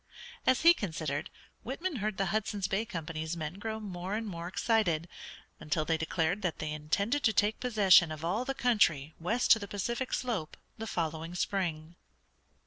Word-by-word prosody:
As 260 - +4
he 335 +1 +8
considered, 160 - -3 0.3
Whitman 310 +5 -3
heard 215 -2 -2
the 195 - +1
Hudson's 210 -2 -1
Bay 200 +4 0
Company's 160 -4 -4
men 160 +4 -5
grow 220 +1 -3
more 190 -1 -4
and 225 +1 -2
more 170 -4 -5
excited, 180 -5 +1 0.5
until 155 +1 -1
they 165 - +2
declared 160 +4 0
that 180 -5 -1
they 155 0 -3
intended 200 - 0
to 220 - +4
take 210 +1 +2
possession 200 -8 +5
of 155 +1 -5
all 200 +8 0
the 270 +1 -3
country 165 - +2
west 220 +9 +1
to 225 - +8
the 200 - -6
Pacific 235 +6 -3
slope 225 -11 -2 0.2
the 225 - -4
following 165 -1 -3
spring. 170 -3 -2
190 Hz, 170 wpm, -31 LUFS, 160-220 Hz, 0.5 s, he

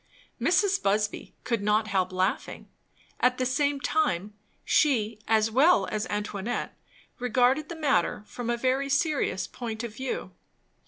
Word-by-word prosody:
Mrs. 400 -1 +2
Busby 210 +1 -1
could 235 -4 -1
not 210 +2 +2
help 185 -3 0
laughing. 185 +2 -2 0.5
At 250 0 +3
the 255 - 0
same 285 +2 +1
time, 210 - 0 0.3
she 230 -8 +2
as 220 0 +3
well 300 +10 +5
as 215 0 -2
Antoinette 205 +1 -3 0.4
regarded 250 +5 +2
the 340 - -5
matter 275 - +1
from 240 +2 -6
a 240 - +1
very 260 +3 0
serious 275 - 0
point 225 -2 -6
of 235 -3 -5
view. 265 0 -4
240 Hz, 140 wpm, -27 LUFS, 210-275 Hz, 0.5 s, well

